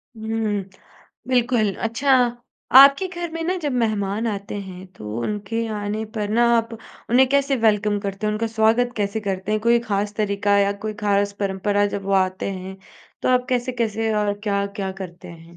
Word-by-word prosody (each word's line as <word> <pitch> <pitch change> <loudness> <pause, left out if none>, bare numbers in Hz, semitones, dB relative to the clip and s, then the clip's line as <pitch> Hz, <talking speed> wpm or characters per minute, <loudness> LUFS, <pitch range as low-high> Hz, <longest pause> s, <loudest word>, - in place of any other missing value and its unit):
हुँ, 220 -2 -2 0.7
बिल्कुल। 240 -4 +2
अच्छा, 250 +5 +1 0.7
आपके 275 +7 +7
घर 345 -2 -5
में 330 0 -4
ना 365 +3 0
जब 295 -5 -2
मेहमान 210 0 -1
आते 200 -1 -5
हैं 185 -1 -10
तो 105 +1 -6
उनके 210 - -3
आने 210 +1 -3
पर 210 -2 -2
ना 230 +3 +3
आप 230 0 -2 0.3
उन्हें 255 +2 +5
कैसे 275 0 +2
वेलकम 210 -2 +2
करते 200 +1 -4
हैं 210 - +1
उनका 215 +2 -1
स्वागत 225 +2 +2
कैसे 205 +1 -1
करते 195 0 -3
हैं? 215 - +1
कोई 235 +2 +4
खास 205 0 -1
तरीका 200 -1 +1
या 200 0 +3
कोई 215 0 -3
खास 200 0 +2
परंपरा 200 +1 +1
जब 200 - -6
वो 195 - -2
आते 185 +1 -4
हैं? 190 0 -7 0.5
तो - - +1
आप 250 0 +2
कैसे-कैसे 235 -3 -1
और 210 -1 +1
क्या-क्या 200 -1 -2
करते 175 -1 -10
हैं? 170 0 -13
210 Hz, 175 wpm, -22 LUFS, 200-230 Hz, 0.7 s, आपके